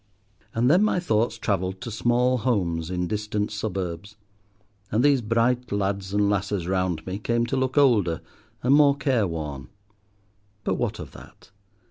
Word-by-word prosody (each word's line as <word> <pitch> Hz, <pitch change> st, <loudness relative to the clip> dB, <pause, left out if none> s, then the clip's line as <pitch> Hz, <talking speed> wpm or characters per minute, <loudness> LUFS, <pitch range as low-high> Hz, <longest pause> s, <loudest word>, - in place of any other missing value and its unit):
And 115 Hz, +2 st, +2 dB
then 175 Hz, +9 st, +5 dB
my 215 Hz, -4 st, +2 dB
thoughts 115 Hz, -8 st, 0 dB
travelled 95 Hz, -3 st, -1 dB
to 120 Hz, -, -5 dB
small 120 Hz, +3 st, +2 dB
homes 90 Hz, -9 st, 0 dB
in 90 Hz, -1 st, -1 dB
distant 105 Hz, +2 st, -2 dB
suburbs, 100 Hz, -2 st, -4 dB, 0.8 s
and 110 Hz, +4 st, +2 dB
these 140 Hz, -3 st, +4 dB
bright 115 Hz, +2 st, +1 dB
lads 100 Hz, -1 st, -1 dB
and 105 Hz, 0 st, +2 dB
lasses 100 Hz, -2 st, -1 dB
round 90 Hz, -3 st, -1 dB
me 95 Hz, +2 st, -4 dB
came 115 Hz, +2 st, 0 dB
to 120 Hz, -, -2 dB
look 130 Hz, +1 st, -1 dB
older 105 Hz, -, +3 dB, 0.4 s
and 125 Hz, +3 st, +4 dB
more 145 Hz, -1 st, +5 dB
careworn. 80 Hz, -, -1 dB, 0.9 s
But -, -, 0 dB
what -, -, -2 dB
of -, -, -8 dB
that? -, -, -15 dB
105 Hz, 150 wpm, -25 LUFS, 95-125 Hz, 0.9 s, then